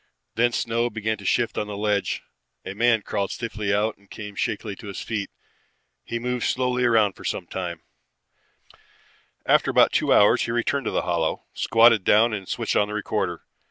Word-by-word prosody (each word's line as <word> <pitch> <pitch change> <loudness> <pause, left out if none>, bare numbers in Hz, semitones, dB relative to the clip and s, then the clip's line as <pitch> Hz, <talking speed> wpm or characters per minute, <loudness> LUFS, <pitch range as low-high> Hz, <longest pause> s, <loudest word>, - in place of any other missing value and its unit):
Then 120 +1 +2
snow 115 +1 0
began 110 -1 -3
to 100 - -11
shift 120 +4 +1
on 105 - -3
the 105 -1 -6
ledge. 105 -1 -1 0.4
A - - -5
man 115 0 +2
crawled 100 0 -2
stiffly 110 -4 -3
out 105 +2 0
and 100 0 -27
came 105 -1 -8
shakily 100 +1 -3
to - - -10
his 100 - -6
feet. 105 -3 -3 0.7
He 120 - -4
moved 125 0 -2
slowly 125 -1 0
around 110 -4 +3
for - - -14
some 90 - -3
time. 85 -2 -5 1.6
After - - +3
about - - +5
two - - +1
hours 105 - +5
he - - -3
returned 120 +3 0
to - - -1
the - - 0
hollow, 85 -3 -1
squatted 115 -2 +4
down 110 +4 +4
and 95 -3 -5
switched - - -2
on 105 - +3
the 105 - -5
recorder. 105 - -2
110 Hz, 185 wpm, -24 LUFS, 100-115 Hz, 1.6 s, about